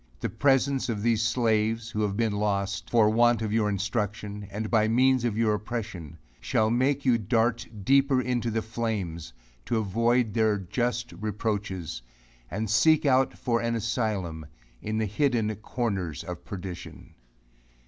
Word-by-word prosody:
The - - -2
presence 135 -1 +2
of 105 -3 -2
these 115 -2 +2
slaves, 115 -1 +1
who 105 - -2
have 100 -1 -1
been 115 -2 +1
lost, 100 -2 -1
for 115 -3 +4
want 120 0 +3
of 110 -1 -2
your 110 -2 +2
instruction, 105 0 -3
and 105 +2 -4
by 110 -2 +4
means 130 +2 +3
of 115 -3 -1
your 110 -2 +2
oppression, 105 -7 -5 0.2
shall 110 0 +1
make 135 +4 +1
you 120 -3 +4
dart 115 +2 +1 0.2
deeper 135 +2 +4
into 125 -2 -1
the 110 0 -1
flames, 105 -8 -3 0.3
to 115 - 0
avoid 115 +2 +1
their 110 -2 +2
just 120 +5 -2
reproaches, 100 - -3 0.5
and 110 +5 -3
seek 155 +9 +4
out 130 -1 +3
for 115 -2 0
an 115 0 0
asylum, 105 - -2 0.3
in 110 +1 -3
the 110 - +1
hidden 115 -1 +1
corners 100 - -3
of 90 -1 -7
perdition. 90 -2 -8
110 Hz, 150 wpm, -27 LUFS, 105-120 Hz, 0.5 s, for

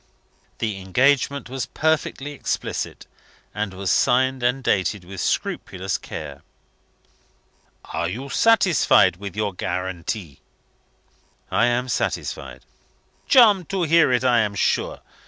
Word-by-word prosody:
The 110 -4 -3
engagement 135 +7 +1
was 130 +1 -4
perfectly 155 -2 -1
explicit, 145 - -4 0.5
and 105 -2 -3
was 95 0 -2
signed 130 +1 +2
and 125 +2 0
dated 95 -2 0
with 95 +1 -7
scrupulous 95 +1 -2
care. - - -8 1.4
"Are 85 - -3
you 125 +9 -6
satisfied 185 - +4
with 100 0 -8
your 105 -2 -1
guarantee?" 90 - -4 1.1
"I 115 - +3
am 120 +1 0
satisfied." - - -3 0.6
"Charmed 210 - +5
to 195 -2 -1
hear 165 -3 +4
it, 125 0 +1
I 125 -2 +4
am 105 -2 0
sure. - - 0
120 Hz, 115 wpm, -22 LUFS, 95-140 Hz, 1.4 s, Charmed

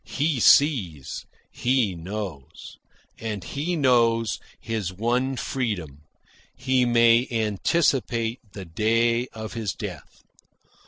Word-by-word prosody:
He 145 -1 0
sees; 105 - +3 0.2
he 125 -6 +1
knows. 90 -5 -7 0.4
And 105 -4 -4
he 155 - -3
knows 115 -6 +2 0.2
his 110 -5 -3
one 120 +7 0
freedom: 90 - -4 0.5
he 130 -1 +1
may 120 0 +4
anticipate 115 - 0
the 95 -2 -7
day 115 +7 +1
of 110 -2 -8
his 110 -3 -3
death. 95 -8 -9
115 Hz, 100 wpm, -24 LUFS, 100-125 Hz, 0.5 s, may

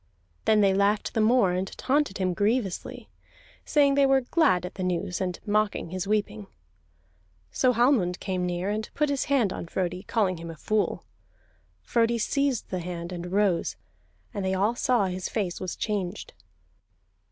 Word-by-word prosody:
Then 215 -1 +4
they 195 -1 +4
laughed 200 +2 +1
the 220 - +1
more, 215 -3 +4
and 185 +2 -1
taunted 280 -6 +1
him 185 -2 0
grievously, 205 0 -1 0.6
saying 285 -2 +4
they 280 0 +4
were 270 0 +4
glad 245 - +2
at 180 - -7
the 190 - -7
news, 180 0 -2
and 180 -1 -2
mocking 210 -5 0
his 185 +1 -3
weeping. 195 - -1 1.0
So 255 - +3
Hallmund 235 -7 +2
came 185 -2 -2
near, 180 +2 -1
and 215 +1 -3
put 300 0 +1
his 280 -2 0
hand 250 -9 +2
on - - -6
Frodi, 180 +1 -2
calling 195 -3 0
him 165 0 -8
a 165 - -7
fool. 215 +4 -1 0.8
Frodi 235 0 +1
seized 275 +2 0
the 185 - -1
hand, 170 0 -5
and 175 0 -6
rose, 190 - +1 0.6
and 200 - -3
they 190 0 0
all 205 +5 +2
saw 240 -3 +2
his 185 0 -3
face 195 -6 -2
was 185 -2 -4
changed. 205 -3 -3
200 Hz, 165 wpm, -26 LUFS, 180-235 Hz, 1.0 s, Then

